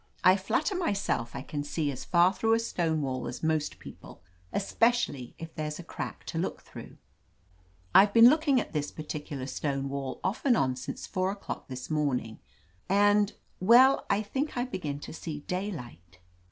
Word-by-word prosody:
"I 185 - +7
flatter 230 - 0
myself 200 - -1
I - - -5
can 145 -1 -4
see 145 0 -1
as 130 - -7
far 175 +2 +4
through 225 +3 +2
a - - +1
stone 165 -9 -1
wall 130 -2 -3
as 125 - -7
most 155 -2 0
people, - - -12 0.3
especially 205 - 0
if 165 -1 -8
there's 150 -1 -4
a 175 - -8
crack - - -6
to - - -4
look - - -3
« - - -28
through. - - -11 1.0
I've 200 +1 +7
been 230 +2 +8
looking 290 -1 +4
at - - -5
this 150 -2 -1
particular 150 -3 -6
stone 140 0 -2
wall 135 -1 -4
off 190 - -2
and 250 -5 +4
on 130 -1 +1
since 125 - -6
four 185 0 -1
o'clock 200 +1 -6
this 130 +3 -7
morning, 135 -7 -1 0.5
and 205 +1 +4 0.2
— - - -14
^well, 250 +6 +6
I 210 - +2
think 270 +6 -3
I 245 - +1
begin 180 - -4
to - - -8
see 155 -2 -6
daylight." 140 - -6
165 Hz, 180 wpm, -29 LUFS, 140-210 Hz, 1.0 s, been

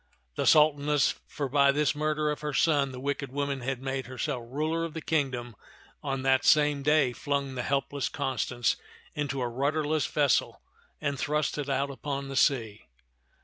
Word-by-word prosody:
The - - -1
Sultaness, 150 -2 +4
for 145 - -3
by 140 +1 +4
this 150 +1 +1
murder 155 0 0
of 150 - -5
her 150 -2 -3
son 145 -4 +3
the 125 - -8
wicked 140 0 -3
woman 140 -1 -2
had 130 +1 -3
made 135 -2 -3
herself 125 -1 -3
ruler 155 +6 -1
of 165 -1 -5
the - - -2
kingdom, 130 -7 -1 0.5
on 135 -2 -3
that 130 -1 +3
same 150 -2 +4
day 145 -3 +3
flung 140 0 -2
the 125 - -3
helpless 140 +1 -1
Constance 130 -3 -1 0.4
into 140 -2 -2
a - - 0
rudder 140 +6 0
less 155 0 0
vessel 145 -4 +1 0.4
and 140 -3 -2
thrust 150 +1 -1
it 145 -1 -3
out 140 +1 0
upon 140 0 -4
the 135 - -5
sea. 115 -8 +1
140 Hz, 175 wpm, -28 LUFS, 130-150 Hz, 0.5 s, Sultaness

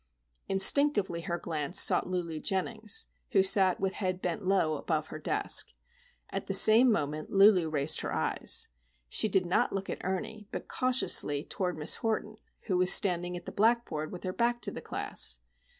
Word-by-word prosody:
Instinctively 195 -2 +3
her 170 +1 -4
glance 160 0 -1
sought - - +4
Lulu 170 -3 -4
Jennings, 210 +5 -2 0.3
who 195 - +4
sat 190 -1 +3
with 190 0 -2
head 185 -2 -4
bent 180 +2 -4
low 185 -5 0
above 155 0 -3
her 155 - -8
desk. 410 - +1 0.6
At - - -5
the - - +2
same 230 +3 +6
moment 150 -5 -3
Lulu 195 -4 +4
raised 150 0 +2
her - - -5
eyes. - - -1 0.4
She 215 - +1
did 190 -2 0
not 175 - 0
look 195 0 -4
at - - -7
Ernie, 195 +3 -5
but - - -7
cautiously 250 - +2
toward 180 -1 -4
Miss 150 +1 +2
Horton, 220 -1 -4 0.2
who 185 -4 -2
was 180 0 +5
standing 180 -3 +2
at 175 - -12
the - - -8
blackboard 215 -8 -1
with 180 - -10
her 185 -1 -4
back 240 +2 -1
toward - - -3
the - - -7
class. - - -4
185 Hz, 175 wpm, -28 LUFS, 170-215 Hz, 0.6 s, same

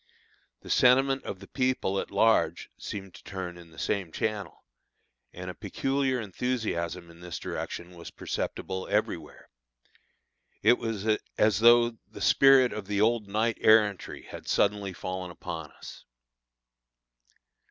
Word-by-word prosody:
The - - -12
sentiment 135 +2 +4
of 95 - -6
the 100 - -11
people 130 -7 0
at - - -4
large 110 +3 +2
seemed 95 -3 -7
to - - -14
turn 95 -3 -6
in 85 -1 -13
the 80 - -18
same 95 -5 -2
channel, 105 +2 -3 0.7
and 90 0 -8
a 90 - -4
peculiar 135 +6 -1
enthusiasm 95 -6 -3
in 85 - -17
this 90 -1 -6
direction 85 +1 -5
was 85 - -9
perceptible 95 0 -4
everywhere. - - -2 1.2
It 125 - +5
was 110 -3 -3 0.3
as 105 -2 +3
though 120 0 +5
the - - -11
spirit 135 -2 +6
of 105 -3 -6
the 100 -1 -1
old 110 0 +2
knight 110 +3 0
errantry 105 -3 +3
had - - -10
suddenly 100 -1 +1
fallen 95 0 -5
upon 85 -3 -7
us. - - -11
105 Hz, 135 wpm, -28 LUFS, 90-120 Hz, 1.2 s, spirit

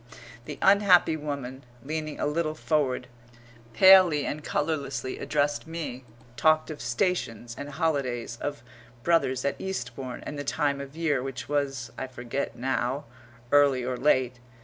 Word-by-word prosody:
The 150 - -7
unhappy 195 -5 +5
woman, 140 -3 -5 0.2
leaning 155 +1 -4
a - - 0
little 155 +1 -1
forward, 145 -6 0 0.7
palely 185 0 +7
and 150 +1 -4
colourlessly 145 -4 -2
addressed 145 0 0
me 155 -6 -5 0.3
talked 155 +4 +3
of 150 - -8
stations 120 - -1
and 145 +3 -7
holidays, 140 -7 -2
of 145 -4 -4 0.4
brothers 135 -7 +2
at 140 - -1
Eastbourne, 135 -9 -5
and 145 - -5
the - - -3
time 140 -1 0
of 140 +1 -9
year, 150 -6 +1
which 135 -1 -6
was, 135 -4 -2
I 130 - -3
forget 130 +2 -4
now, 130 +2 -1 0.5
early 140 -3 +4
or 130 0 -1
late. 125 -2 +2
145 Hz, 140 wpm, -27 LUFS, 130-155 Hz, 0.7 s, palely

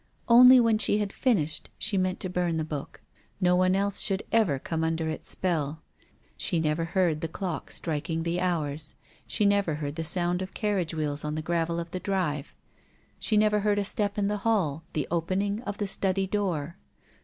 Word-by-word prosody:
Only 250 +2 +9
when 230 -2 +3
she 205 - +3
had 205 -2 -2
finished 160 - 0
she 215 -1 -1
meant 185 -1 0
to - - -1
burn 180 -2 -1
the 160 - 0
book. 150 -3 -6 0.4
No 180 -2 +3
one 185 +1 +3
else 200 0 0
should 195 0 0
ever 210 -12 +3
come 160 +4 -3
under 160 0 -1
its 155 - -3
spell. 160 -4 -1 0.5
She 165 - 0
never 160 +1 0
heard 165 -3 +1
the 165 - -1
clock 175 0 -5
strik 155 -2 -3
ing 165 0 -1
the 170 +1 -1
hours. 155 -4 -2 0.3
She 210 - +1
never 200 -6 +2
heard 145 0 -5
the 165 - -2
sound 175 +2 +1
of 190 - -6
carriage 190 -6 -1
wheels 150 -2 -2
on 150 0 -3
the 155 - -3
gravel 170 0 -1
of 170 0 -6
the 185 - -3
drive. 175 -8 -2 0.6
She 215 - +1
never 210 0 +3
heard 205 0 +1
a 205 - 0
step 205 0 -1
in 200 -1 +1
the 210 0 -1
hall, 190 -9 0
the 150 - -1
opening 190 +5 -1
of 205 0 -4
the 205 - -1
study 195 0 0
door. 180 -5 -2
180 Hz, 200 wpm, -27 LUFS, 160-200 Hz, 0.6 s, Only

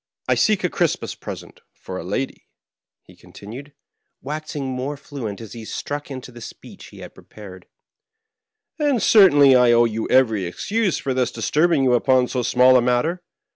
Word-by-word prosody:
I - - +3
seek 215 -4 +1
a 180 - +1
Christmas 170 -3 -1
present - - -10 0.2
for 95 0 -8
a - - -7
lady," 100 +9 -5 0.6
he - - -19
continued, 125 +8 -12 0.5
waxing 150 0 -6
more 130 +2 -4
fluent 130 -8 -7
as 115 -3 -10
he 115 -2 -9
struck 145 +6 -6
into 130 -2 -8
the 120 -1 -13
speech - - -12
he - - -14
had - - -11
pre - - -17
pared; 95 -4 -13 0.6
" 440 -3 -55
and 290 -5 +1
certainly 145 -12 +6
I 125 -1 +5
owe 120 0 +4
you 110 -1 -3
every 110 -7 +2
excuse 200 - -2
for 135 - -3
thus 125 -2 0
disturbing 150 +6 +1
you 125 -1 +3
upon 125 +1 +2
so 125 - -2
small 125 +1 +4
a - - +3
matter. 125 +9 0
130 Hz, 175 wpm, -21 LUFS, 120-155 Hz, 0.6 s, certainly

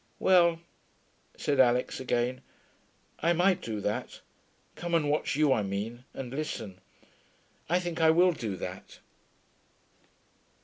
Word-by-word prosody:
'Well,' 170 -3 +4 0.8
said 140 -2 -1
Alix 125 -1 +3
again. 125 0 -1 0.8
'I 170 +2 +2
might 180 +2 +2
do 110 -2 -4
that. 105 +1 -3 0.5
Come 175 -1 -2
and 150 -3 +2
watch 150 - 0
you, 150 -2 +4
I 110 - +1
mean, 105 +5 -4
and 125 -2 -6
listen. 115 -10 -5 0.9
I 175 +2 +3
think 175 -2 -4
I 160 - +6
will 175 +3 +5
do 110 - -4
that.' 90 0 -8
140 Hz, 125 wpm, -29 LUFS, 115-170 Hz, 0.9 s, I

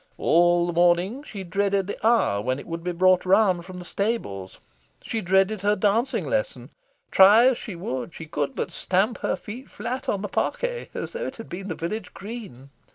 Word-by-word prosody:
All 175 +1 +4
the 175 - -2
morning, 175 +8 +2
she 205 -9 -8
dreaded 195 +2 0
the 205 +3 -2
hour 225 - +3
when 130 +4 -1
it 140 - -9
would 165 0 -6
be 180 - -1
brought 185 +1 +4
round 185 -2 +3
from 185 0 -9
the 180 - -8
stables. 175 - -3 0.5
She 225 - -2
dreaded 190 +2 +2
her 205 +1 +2
dancing 220 +6 +1
lesson. - - -2 0.4
Try 205 +5 +7
as 255 - -1
she 205 - -7
would, 170 -4 -4
she 160 - -9
could 150 -3 -3
but - - -3
stamp 195 +6 0
her - - 0
feet 240 +5 -9
flat 260 +2 -5
on 200 0 -1
the - - -2
parquet, - - -2
as - - -5
though 485 +1 -3
it - - -7
had 225 - -10
been 190 +3 -6
the 170 - -3
village 180 +5 -5
green. 195 - -9
190 Hz, 200 wpm, -25 LUFS, 175-220 Hz, 0.5 s, Try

